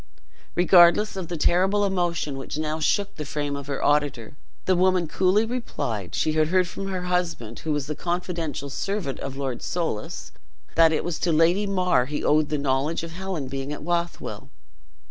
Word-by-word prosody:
Regardless 175 +3 +6
of 185 -3 -4
the 175 0 -4
terrible 190 +6 +3
emotion 175 -6 -1
which 135 +2 -5
now 155 0 -2
shook 200 +6 0
the 155 - -3
frame 145 0 -3
of 140 0 -7
her 140 -2 -2
auditor, 145 -4 +1 0.3
the 185 - +3
woman 185 -1 +3
coolly 190 +6 +2
replied, 120 - -4
she 155 - +1
had 155 0 +2
heard 185 +1 +2
from 195 +2 -6
her 185 -2 -3
husband, 175 -11 -2
who 160 - -3
was 145 -2 0
the 150 - -3
confidential 170 -4 -3
servant 195 -4 -3
of 135 0 -5
Lord 135 -3 -3
Soulis, 160 -12 -3 0.4
that 165 -1 +6
it 160 - 0
was 170 -2 -3
to 175 - +1
Lady 170 +6 +3
mar 180 -9 +2
he 145 +1 -3
owed 150 0 +3
the 150 - 0
knowledge 140 +4 0
of 165 - -6
Helen 180 -5 -4
being 135 +1 -4
at 150 - -6
Bothwell. 170 0 -3
165 Hz, 185 wpm, -25 LUFS, 145-180 Hz, 0.4 s, Regardless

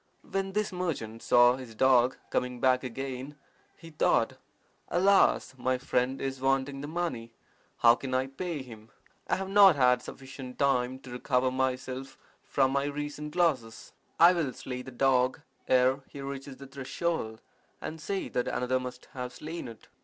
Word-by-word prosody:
When 195 0 -2
this 210 0 0
merchant 145 -12 -3
saw 120 +1 +5
his 125 -4 -10
dog 130 +1 +4
coming 125 -1 -1
back 130 0 +3
again, 130 +2 -5 0.4
he 165 - -12
thought, 155 - +2 0.5
'Alas! 195 -5 +3
my 130 +1 +1
friend 125 0 0
is 135 -1 -4
wanting 135 +1 0
the 145 - -5
money. 150 -9 -3 0.4
How 115 0 +7
can 130 +1 -3
I 130 0 +2
pay 145 +2 -5
him? 110 -3 -13 0.4
I - - +2
have 190 0 -4
not 195 -3 +7
had 125 -2 +4
sufficient 130 -1 -9
time 130 -2 +1
to 130 - -11
recover 125 +1 +1
myself 130 0 -2 0.2
from 135 -1 +1
my 140 +1 +1
recent 150 +1 -5
losses. 135 -11 0 0.3
I 170 +2 +8
will 160 -7 -1
slay 125 +1 -6
the 130 - -9
dog 130 0 +2 0.3
ere 130 +1 +4
he 140 - -10
reaches 135 -1 -6
the 140 - -10
threshold, 135 -3 -3 0.4
and 160 0 -6
say 195 +5 -2
that 125 - -2
another 125 +1 0
must 125 0 -7
have 125 -1 -5
slain 160 -1 -6
it. 115 -2 -12
130 Hz, 160 wpm, -29 LUFS, 125-145 Hz, 0.5 s, I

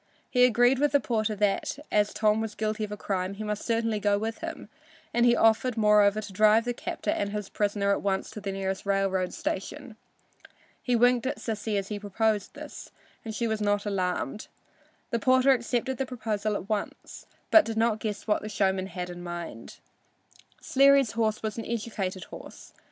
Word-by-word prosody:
He 250 -1 +6
agreed 245 +2 +4
with 295 0 +2
the 285 - +5
porter 220 -4 -1
that 205 +5 0
as 210 0 +2
Tom 215 0 +2
was 220 -1 -4
guilty 215 0 -2
of 210 - -4
a 210 - -5
crime 190 -1 -2
he 215 - -6
must 210 -1 -3
certainly 225 -2 0
go 205 0 +2
with 220 +2 -3
him, - - -6 0.5
and 240 0 +4
he 240 - +5
offered, 225 +2 +3
moreover, 210 -1 +4
to 205 -2 -9
drive 215 +3 +4
the 245 - -1
captor 215 - -3
and 200 - -1
his 210 -2 -4
prisoner 205 -1 0
at 200 - +1
once 195 -1 -1
to 210 - -8
the 200 -1 -3
nearest 195 0 -3
railroad 195 -2 0
station. 255 +4 -5 0.9
He 250 - +1
winked 245 +1 +3
at - - -2
Sissy 215 -1 -3
as 195 0 -3
he 210 -1 -4
proposed 205 0 -1
this, - - -9 0.3
and 220 -2 -6
she 235 +1 -1
was 220 -1 -2
not 205 0 +1
alarmed. 185 -3 -2 0.6
The 235 - +1
porter 260 +2 +4
accepted 245 +1 0
the 270 - -1
proposal 215 -4 -2
at 195 - -5
once, 210 -2 -5 0.2
but 325 -5 +7
he - - -2
did - - -7
not 225 -1 +2
guess 215 -2 -4
what 210 - +1
the 215 - -6
showman 190 -2 0
had 180 -1 -5
in 175 0 -8
mind. 175 -9 -7 0.8
Sleary's 275 -2 +4
horse 220 -2 -1
was 215 +1 -3
an 225 - -5
educated 205 -5 -3
horse. - - -12
215 Hz, 195 wpm, -27 LUFS, 200-230 Hz, 0.9 s, but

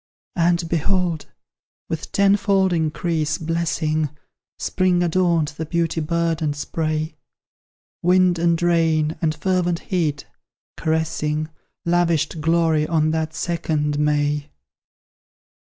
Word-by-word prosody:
And, 170 0 +2
behold! 170 0 0 0.6
with 160 -1 -5
tenfold 195 -1 +3
increase 160 -1 0
blessing, 160 -2 -1 0.5
Spring 185 -2 +1
adorned 170 -3 +2
the 160 +1 -6
beauty 165 0 0
burdened 165 -1 0
spray; 155 +1 -2 0.8
Wind 180 0 +3
and 170 -1 +2
rain 160 -2 +2
and 155 -2 +1
fervent 175 +1 0
heat, 160 -7 -2 0.5
caressing, 155 -1 -1 0.4
Lavished 170 -2 +1
glory 160 -1 +2
on 155 -1 +2
that 160 0 -2
second 155 -4 -1
May! 150 0 +1
165 Hz, 95 wpm, -22 LUFS, 155-175 Hz, 0.8 s, tenfold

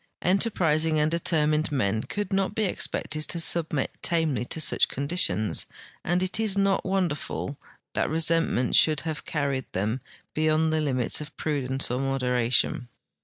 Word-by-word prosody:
Enterprising 165 -5 +2
and 150 +1 +1
determined 155 -2 +1
men 110 -6 0
could 205 - -4
not 195 0 0
be 220 - 0
expected 155 -5 -2
to 170 - -2
submit 160 -4 +1
tamely 160 -8 0
to 160 - -1
such 150 - +3
conditions, 140 - 0 0.4
and 180 +2 +1
it 185 +3 0
is 215 -3 +2
not 195 -1 +2
wonderful 175 -6 -2 0.4
that - - 0
resentment 165 -5 +1
should 155 -2 +4
have 160 -2 -5
carried 140 -4 -2
tncm 105 +7 -1 0.3
beyond 155 0 +1
tbe 155 - +1
limits 130 -2 0
of 150 +1 -10
prudence 135 -4 -1
or 125 - -1
moderation. 125 -2 0
155 Hz, 145 wpm, -26 LUFS, 135-170 Hz, 0.4 s, should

